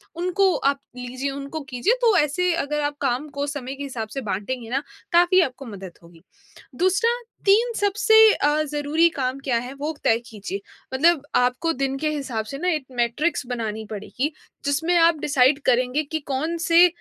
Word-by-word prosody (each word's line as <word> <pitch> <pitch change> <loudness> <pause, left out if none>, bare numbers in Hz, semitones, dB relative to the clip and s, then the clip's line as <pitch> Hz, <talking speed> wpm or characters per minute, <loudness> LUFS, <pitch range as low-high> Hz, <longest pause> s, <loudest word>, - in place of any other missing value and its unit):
उनको 365 +2 +2
आप 275 0 +1 0.2
लीजिए, 255 +2 -4
उनको 280 +3 -6
कीजिए। 255 - +1
तो 455 -4 +4
ऐसे 345 +4 +2
अगर 300 -2 -1
आप 290 0 -1
काम 270 +2 0
को 285 - 0
समय 275 -2 -5
के 285 - -7
हिसाब 245 -5 -5
से 270 - -3
बाँटेंगे 225 +3 -4
ना, 260 +3 0 0.3
काफ़ी 350 +2 +5
आपको 270 -3 -3
मदद 195 -5 -8
होगी। 170 -1 -17 0.5
दूसरा, 375 - +2 0.3
3 450 +4 +4
सबसे 415 +2 +3 0.2
अ, 295 +1 +1
ज़रूरी 300 +3 +2
काम 260 +1 -1
क्या 250 -4 +1
हैं? 250 +3 -7
वो 290 +3 -4
तय 225 - +3
कीजिए। 205 -3 -6 0.3
मतलब 310 +1 +3
आपको 250 +7 +2
दिन 270 0 -2
के 305 +2 -1
हिसाब 260 -7 -3
से 275 +6 -6
ना, 355 +6 -3
एक 305 -6 -1 0.2
मैट्रिक्स 265 +6 0
बनानी 220 -3 -4
पड़ेगी, 245 +8 -3 0.3
जिसमें 320 +5 +1
आप 330 -2 +4
डिसाइड 275 -1 +3
करेंगे 255 +4 +2
कि 315 +2 -4
कौन-से 335 +4 +4
280 Hz, 175 wpm, -23 LUFS, 250-330 Hz, 0.5 s, काफ़ी